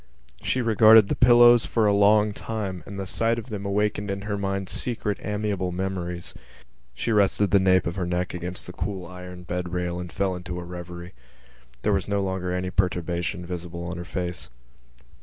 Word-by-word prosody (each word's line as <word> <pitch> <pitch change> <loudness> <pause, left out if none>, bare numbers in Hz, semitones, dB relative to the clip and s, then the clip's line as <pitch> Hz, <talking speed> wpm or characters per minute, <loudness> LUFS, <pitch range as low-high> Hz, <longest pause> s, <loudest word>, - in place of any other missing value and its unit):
She 130 - 0
regarded 110 -2 +7
the - - +1
pillows 120 -1 +6
for 115 -2 +1
a 105 - +4
long 105 +1 +4
time 100 -5 -4
and 100 0 -7
the 95 - -3
sight 115 +4 0
of 115 +2 -7
them 100 -2 -4
awakened 105 0 0
in 100 0 -3
her 105 -1 -2
mind 100 -1 -2
secret 105 -3 -3
amiable 105 -3 -2
memories. 90 -1 -4 0.6
She 115 - -2
rested 100 -1 +3
the 100 - +6
nape 95 -1 +3
of 85 +2 -3
her 90 -2 -1
neck 90 +1 -1
against 90 +1 -5
the 90 - -9
cool 95 0 -4
iron 90 0 -9
bed 90 0 -4
rail 90 -1 -2
and 90 -1 -6
fell 95 -1 -1
into 90 0 -6
a - - -6
revery. 85 0 -8 0.7
There 105 - +2
was 95 -2 0
no 100 -1 0
longer 95 -1 -2
any 90 0 -2
perturbation 90 -2 -1
visible 85 -1 -6
on 85 0 -5
her 85 - -5
face. 90 -1 -4
95 Hz, 190 wpm, -25 LUFS, 90-105 Hz, 0.7 s, regarded